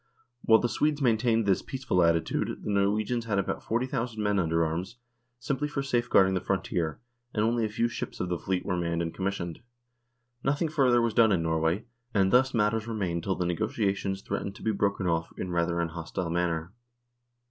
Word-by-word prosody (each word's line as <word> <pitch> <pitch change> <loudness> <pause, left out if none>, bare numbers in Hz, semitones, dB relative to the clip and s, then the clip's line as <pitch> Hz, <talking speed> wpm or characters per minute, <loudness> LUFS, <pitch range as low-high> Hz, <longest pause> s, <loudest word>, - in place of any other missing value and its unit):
While 110 - +6
the 120 - 0
Swedes 150 +5 0
maintained 115 -3 +2
this 95 -2 +2
"peaceful" 130 -9 -1
attitude 85 -1 +1
the - - -2
Norwegians 105 +4 +1
had 105 -3 0
about 100 - -1
40,000 115 -1 -2
men 105 -1 +1
under 85 -1 +2
arms, 85 +9 -4 0.4
simply 135 +4 -2
for 145 -2 -3
safeguarding 120 -7 +3
the 90 - 0
frontier, 85 -4 -1 0.4
and 105 - +2
only 115 0 +1
a - - -2
few 115 +2 +1
ships 120 - -6
of 90 - -1
the 90 -1 -2
fleet 95 -1 -2
were 90 - 0
manned 85 -1 -1
and 80 - -4
commissioned. 95 -3 -3 0.8
Nothing 145 +4 +1
further 125 -6 +3
was 115 -2 0
done 110 -1 +5
in 85 -4 +2
Norway, 80 +4 0 0.3
and 95 -1 +3
thus 130 +2 +5
matters 110 -1 +1
remained 95 -7 -2
till 95 +3 -1
the 90 - -1
negotiations 100 0 -1
threatened 100 - -3
to - - -12
be 110 - +2
broken 100 -2 0
off 80 -1 0
in 90 - -4
rather 85 0 0
an 85 -1 0
hostile 85 +1 -4
manner. 85 0 -1
100 Hz, 190 wpm, -28 LUFS, 85-115 Hz, 0.8 s, While